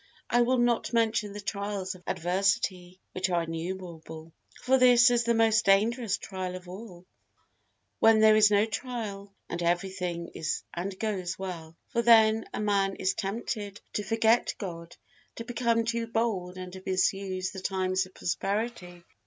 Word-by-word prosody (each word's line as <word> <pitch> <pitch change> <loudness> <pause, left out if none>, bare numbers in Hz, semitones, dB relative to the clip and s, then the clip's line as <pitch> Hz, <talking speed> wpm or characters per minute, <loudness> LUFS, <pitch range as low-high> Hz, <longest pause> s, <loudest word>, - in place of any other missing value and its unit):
I 240 - +4
will 255 +2 +2
not 240 -1 +1
mention 220 -2 +1
the 205 - -7
trials 200 -1 -3
of 185 - -14
adversity, 180 0 -1
which 185 +1 -2
are 175 -2 +1
innumerable. 165 -1 -7 0.3
For 260 +1 +3
this 245 -1 +6
is 240 -1 +2
the 235 0 +2
most 225 0 +3
dangerous 215 +3 +2
trial 185 -2 -5
of 180 0 -10
all, 185 -1 -10 0.9
when 225 -1 +6
there 215 0 +6
is 215 -1 +6
no 205 0 +4
trial 215 -4 -5 0.2
and 170 - -4
every 175 +2 0
thing 175 -2 -4
is 160 0 -3
and 185 +2 -4
goes 185 -4 -3
well; 165 -4 -7
for 235 - 0
then 225 -1 +5
a - - -4
man 200 -2 +1
is 190 - 0
tempted 205 0 -4
to - - -1
forget 225 +2 +2
God, 170 -4 -7 0.4
to 230 - -6
become 235 -1 0
too 235 0 -1
bold 215 -6 -2
and 185 -1 -7
to 190 - -9
misuse 185 0 -1
the 190 - -7
times 185 0 0
of 185 - -23
prosperity. 180 0 -3
195 Hz, 160 wpm, -28 LUFS, 185-225 Hz, 0.9 s, this